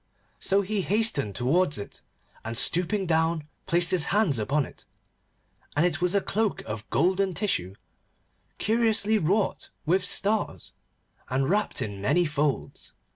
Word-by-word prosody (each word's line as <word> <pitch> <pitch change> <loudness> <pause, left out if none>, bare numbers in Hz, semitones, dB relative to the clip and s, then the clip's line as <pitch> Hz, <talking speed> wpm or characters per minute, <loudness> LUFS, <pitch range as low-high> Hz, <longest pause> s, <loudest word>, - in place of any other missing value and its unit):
So 195 +1 +2
he 200 +1 -1
hastened 190 - +1
towards 150 +6 +1
it, 100 - -8 0.4
and 115 +1 -3
stooping 180 - +1
down 160 -2 +1 0.2
placed 170 0 +3
his 175 -5 +3
hands 190 - +2
upon 140 +6 0
it, - - -15 0.9
and 150 +4 +3
it 180 - -1
was 180 +2 +1
a 200 - +3
cloak 215 +1 -1
of 110 0 -6
golden 190 0 +1
tissue, 95 - -1 0.8
curiously 220 -1 +2
wrought 195 +5 0 0.2
with 185 +4 +2
stars, 205 +3 -1 0.6
and 135 +1 0
wrapped 205 -6 0
in 100 -3 -6
many 175 - +2
folds. 145 -2 -2
175 Hz, 135 wpm, -26 LUFS, 140-200 Hz, 0.9 s, placed